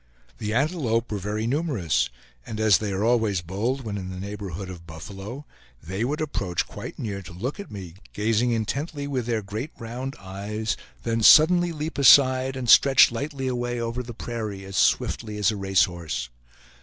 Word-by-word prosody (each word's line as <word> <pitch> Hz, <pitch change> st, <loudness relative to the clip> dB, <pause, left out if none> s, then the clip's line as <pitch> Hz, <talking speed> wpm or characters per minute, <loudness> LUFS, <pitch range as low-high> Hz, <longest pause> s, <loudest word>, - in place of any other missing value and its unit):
The 105 Hz, -, -3 dB
antelope 120 Hz, -4 st, 0 dB
were 105 Hz, -, -2 dB
very 105 Hz, +3 st, -2 dB
numerous; 115 Hz, -, 0 dB, 0.3 s
and 110 Hz, -, -6 dB
as 110 Hz, -3 st, +5 dB
they 105 Hz, -2 st, -3 dB
are 95 Hz, +2 st, -1 dB
always 110 Hz, -5 st, +2 dB
bold 110 Hz, +10 st, -2 dB
when 105 Hz, -3 st, -4 dB
in 95 Hz, -1 st, -6 dB
the 90 Hz, 0 st, -6 dB
neighborhood 100 Hz, -2 st, -6 dB
of 85 Hz, -2 st, -10 dB
buffalo, 100 Hz, -, -8 dB, 0.3 s
they 95 Hz, -, -4 dB
would 145 Hz, +6 st, -1 dB
approach 95 Hz, -, -1 dB
quite -, -, -8 dB
near 100 Hz, -3 st, -4 dB
to 90 Hz, -, -11 dB
look 115 Hz, -, -4 dB
at 200 Hz, -, -7 dB
me, 95 Hz, -5 st, -8 dB, 0.2 s
gazing 115 Hz, +3 st, +1 dB
intently 140 Hz, +6 st, -2 dB
with 130 Hz, -4 st, -2 dB
their 115 Hz, -3 st, -1 dB
great 110 Hz, +8 st, -5 dB
round 125 Hz, +4 st, -5 dB
eyes, 100 Hz, +3 st, -4 dB, 0.3 s
then 115 Hz, -1 st, 0 dB
suddenly 175 Hz, +8 st, +7 dB
leap 155 Hz, -1 st, -4 dB
aside, 130 Hz, -1 st, +6 dB
and 130 Hz, -2 st, -4 dB
stretch 135 Hz, +1 st, +7 dB
lightly 135 Hz, +3 st, -4 dB
away 120 Hz, -1 st, -2 dB
over 115 Hz, +1 st, -2 dB
the 120 Hz, -2 st, -8 dB
prairie, 110 Hz, -5 st, -5 dB
as 95 Hz, 0 st, -8 dB
swiftly 105 Hz, +1 st, +1 dB
as 105 Hz, +1 st, +3 dB
a -, -, -4 dB
racehorse. 90 Hz, -9 st, 0 dB
110 Hz, 175 wpm, -25 LUFS, 100-130 Hz, 0.3 s, suddenly